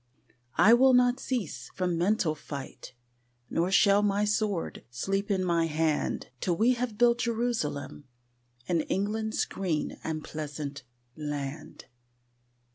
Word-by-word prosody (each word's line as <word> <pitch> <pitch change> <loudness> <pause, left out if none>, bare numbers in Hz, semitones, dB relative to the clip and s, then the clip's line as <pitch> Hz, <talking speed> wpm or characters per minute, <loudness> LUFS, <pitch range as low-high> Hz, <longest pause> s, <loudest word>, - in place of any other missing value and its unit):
I 220 - +7
will 260 +1 +6
not 250 +1 +4
cease 190 - -3
from 180 -2 0
mental 175 -2 +1
fight, 140 -4 -8 0.6
Nor 170 +2 +1
shall 200 +1 +5
my 205 0 +2
sword 210 -4 -1
sleep 195 - -2
in 190 -2 +1
my 170 -2 +2
hand 155 -3 -1
Till 175 +3 0
we 235 +4 +4
have 240 -3 -3
built 240 0 +4
Jerusalem 225 - -2 0.6
In 170 -2 +1
England's 215 +6 -1
green 175 -6 -3
and 155 -1 -3
pleasant 145 -2 -5 0.3
land. 145 -1 -5
190 Hz, 120 wpm, -28 LUFS, 155-220 Hz, 0.6 s, I